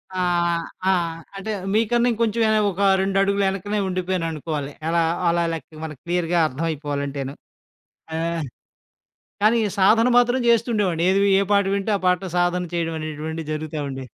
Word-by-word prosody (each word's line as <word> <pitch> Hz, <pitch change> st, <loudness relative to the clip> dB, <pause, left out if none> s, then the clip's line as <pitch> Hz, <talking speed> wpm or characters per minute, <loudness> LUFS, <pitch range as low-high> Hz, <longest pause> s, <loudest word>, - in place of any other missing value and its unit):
ఆహ్, 175 Hz, -2 st, +1 dB, 0.3 s
ఆహ్, 170 Hz, -3 st, +1 dB, 0.2 s
అంటే 205 Hz, +3 st, -4 dB, 0.2 s
మీకన్నా 235 Hz, +2 st, +2 dB
ఇంకొంచెం 230 Hz, 0 st, 0 dB
ఏన 215 Hz, -, +3 dB
ఒక 195 Hz, +2 st, -5 dB, 0.2 s
రెండడుగులు 195 Hz, +1 st, +1 dB
ఎనకనే 205 Hz, +2 st, -2 dB
ఉండిపోయాననుకోవాలి. 165 Hz, -5 st, -3 dB, 0.2 s
ఎలా 170 Hz, +1 st, +2 dB, 0.3 s
అలా 170 Hz, 0 st, +2 dB
లెక్క 155 Hz, 0 st, -8 dB
మనకు 150 Hz, -4 st, -8 dB
క్లియర్‌గా 175 Hz, 0 st, 0 dB
అర్థమైపోవాలంటేను. 140 Hz, -2 st, -3 dB, 0.8 s
ఆహ్, 165 Hz, -1 st, -2 dB, 1.0 s
కానీ 225 Hz, +2 st, +4 dB, 0.2 s
సాధన 225 Hz, +5 st, +5 dB
మాత్రం 245 Hz, +1 st, +3 dB
జేస్తుండేవాడిని. 210 Hz, -7 st, +2 dB
ఏదివి 200 Hz, +1 st, +3 dB
ఏ -, -, +2 dB
పాట 200 Hz, 0 st, +4 dB
వింటే 200 Hz, +2 st, -1 dB
ఆ -, -, -14 dB
పాట 180 Hz, 0 st, +1 dB
సాధన 175 Hz, 0 st, +1 dB
చేయడమనేటువంటిది 160 Hz, -1 st, -4 dB
జరుగుతా 155 Hz, 0 st, -4 dB
ఉండే. 135 Hz, -1 st, -6 dB
175 Hz, 130 wpm, -22 LUFS, 160-200 Hz, 1.0 s, సాధన